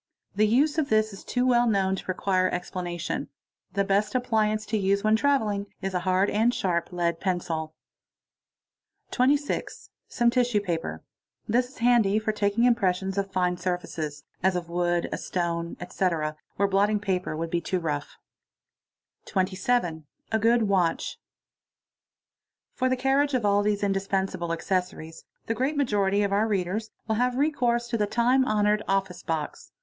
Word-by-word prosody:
The 215 Hz, +1 st, +4 dB
use 290 Hz, +8 st, +3 dB
of 290 Hz, -, -1 dB
this 215 Hz, -1 st, +2 dB
is 195 Hz, -, -10 dB
too 250 Hz, 0 st, 0 dB
well 240 Hz, -1 st, +4 dB
nown 195 Hz, -3 st, +2 dB
to -, -, -7 dB
require 185 Hz, 0 st, +1 dB
explanation. 175 Hz, -1 st, -4 dB, 0.5 s
The 200 Hz, -, +1 dB
best 200 Hz, +3 st, +1 dB
appliance 215 Hz, -3 st, +1 dB
to 220 Hz, -, -2 dB
use 200 Hz, +1 st, +1 dB
when 215 Hz, 0 st, +4 dB
travel 270 Hz, -2 st, +2 dB
ig 200 Hz, 0 st, -3 dB
is 195 Hz, -1 st, -4 dB
a 180 Hz, -, +1 dB
hard 185 Hz, +2 st, +2 dB
and 225 Hz, +3 st, +3 dB
sharp 185 Hz, -9 st, -1 dB
lead 170 Hz, -2 st, -1 dB
pencil. 165 Hz, -4 st, -2 dB, 1.3 s
| -, -, -45 dB
_ -, -, -35 dB
26. 280 Hz, +3 st, 0 dB, 0.2 s
Some 240 Hz, -1 st, +2 dB
tisswe 240 Hz, -4 st, +1 dB
paper. 165 Hz, -, -3 dB, 0.4 s
This 245 Hz, +3 st, +1 dB
is 270 Hz, -, -18 dB
handy 230 Hz, -4 st, +3 dB
for 215 Hz, 0 st, 0 dB
taking 210 Hz, +2 st, +1 dB
impressions 195 Hz, -6 st, +2 dB
of 200 Hz, -1 st, -2 dB
fine 180 Hz, -1 st, 0 dB
fe 185 Hz, +1 st, -2 dB
se8, 155 Hz, -4 st, -4 dB, 0.2 s
as 190 Hz, +1 st, +2 dB
Of 175 Hz, -1 st, -3 dB
wood, 175 Hz, 0 st, 0 dB
a -, -, -3 dB
stone, 170 Hz, -1 st, -2 dB
etc., 165 Hz, -4 st, -1 dB, 0.2 s
where 200 Hz, -, +2 dB
blotting 205 Hz, +2 st, +2 dB
paper 185 Hz, -6 st, -2 dB
would 165 Hz, 0 st, -3 dB
be 175 Hz, -, 0 dB
too 185 Hz, -, -1 dB
a 160 Hz, -4 st, -1 dB
"oT. -, -, -17 dB, 1.3 s
A. 185 Hz, -3 st, 0 dB, 0.4 s
good 230 Hz, +2 st, +3 dB
witch: 190 Hz, -5 st, +1 dB
SE -, -, -12 dB, 1.6 s
For 255 Hz, -1 st, 0 dB
the 255 Hz, -, +1 dB
carriage 270 Hz, +2 st, +2 dB
of 240 Hz, -4 st, 0 dB
all 205 Hz, 0 st, +4 dB
these 205 Hz, 0 st, 0 dB
indispensable 195 Hz, -2 st, -1 dB
décosauries, 165 Hz, -1 st, -3 dB, 0.2 s
the 225 Hz, -, -1 dB
great 270 Hz, +5 st, -1 dB
majo 210 Hz, -8 st, +2 dB
y 195 Hz, -, 0 dB
of 200 Hz, -1 st, 0 dB
our 210 Hz, +2 st, +2 dB
readers 205 Hz, +2 st, -1 dB, 0.2 s
will 220 Hz, -1 st, 0 dB
have 250 Hz, +1 st, +1 dB
recourse 245 Hz, -5 st, +1 dB
to 230 Hz, -, -1 dB
the 210 Hz, -, +1 dB
time 245 Hz, +4 st, +3 dB
honoured 210 Hz, 0 st, +2 dB
" -, -, -26 dB
Office 190 Hz, -2 st, -5 dB
box." 160 Hz, -2 st, -4 dB
200 Hz, 170 wpm, -26 LUFS, 180-230 Hz, 1.6 s, The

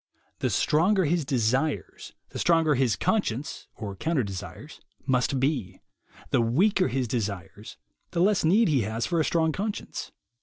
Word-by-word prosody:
The -, -, 0 dB
stronger 180 Hz, +6 st, +2 dB
his 165 Hz, 0 st, +1 dB
desires, 130 Hz, +4 st, -1 dB, 0.2 s
the -, -, -7 dB
stronger 165 Hz, -3 st, +3 dB
his 130 Hz, -4 st, +2 dB
conscience, 150 Hz, -, -1 dB
or 100 Hz, -4 st, -6 dB
counter 155 Hz, -, 0 dB
desires, 100 Hz, -, -8 dB, 0.2 s
must 130 Hz, 0 st, +1 dB
be; 125 Hz, -, -1 dB, 0.5 s
the -, -, +3 dB
weaker 185 Hz, -, +2 dB
his 130 Hz, -1 st, -1 dB
desires, 100 Hz, -3 st, -5 dB, 0.3 s
the 170 Hz, -, -3 dB
less 200 Hz, +1 st, +3 dB
need 200 Hz, +8 st, +4 dB
he 145 Hz, -6 st, +2 dB
has 110 Hz, +2 st, -2 dB
for 170 Hz, -2 st, 0 dB
a -, -, +3 dB
strong 160 Hz, 0 st, +1 dB
conscience. 205 Hz, +6 st, -4 dB
140 Hz, 150 wpm, -26 LUFS, 115-170 Hz, 0.5 s, need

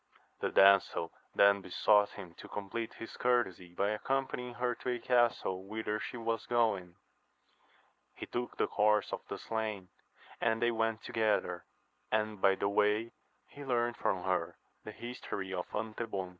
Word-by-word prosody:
The -, -, 0 dB
damsel 100 Hz, -1 st, +5 dB, 0.2 s
then 100 Hz, 0 st, +6 dB
besought 105 Hz, +3 st, +3 dB
him 90 Hz, -4 st, -9 dB
to -, -, -9 dB
compleat 105 Hz, +3 st, -4 dB
his 115 Hz, -, -8 dB
courtesy 95 Hz, -8 st, 0 dB
by 100 Hz, +2 st, +1 dB
accompanying 125 Hz, +1 st, -2 dB
her 125 Hz, +1 st, 0 dB
to 125 Hz, -, -5 dB
a 125 Hz, -, 0 dB
castle 120 Hz, -6 st, +1 dB
whither 110 Hz, 0 st, -2 dB
she 125 Hz, -, -5 dB
was 115 Hz, -1 st, -2 dB
going. 100 Hz, -7 st, +1 dB, 1.2 s
He -, -, -6 dB
took 120 Hz, 0 st, -4 dB
the -, -, +3 dB
horse 105 Hz, 0 st, +2 dB
of -, -, -3 dB
the -, -, -5 dB
slain, 110 Hz, -4 st, -3 dB, 0.5 s
and 115 Hz, -1 st, +2 dB
they 120 Hz, 0 st, +2 dB
went 115 Hz, -1 st, 0 dB
on -, -, -24 dB
together, 110 Hz, -2 st, 0 dB, 0.5 s
and 110 Hz, -2 st, 0 dB
by 95 Hz, -1 st, +5 dB
the 100 Hz, -, -1 dB
way 105 Hz, +3 st, +2 dB, 0.4 s
he 145 Hz, -, -11 dB
learnt 120 Hz, -3 st, 0 dB
from 90 Hz, -5 st, -1 dB
her 90 Hz, -2 st, -1 dB, 0.3 s
the 105 Hz, -, -7 dB
history 100 Hz, -5 st, -6 dB
of 90 Hz, -1 st, -3 dB
Antebon. 110 Hz, -3 st, -3 dB
110 Hz, 155 wpm, -33 LUFS, 100-120 Hz, 1.2 s, then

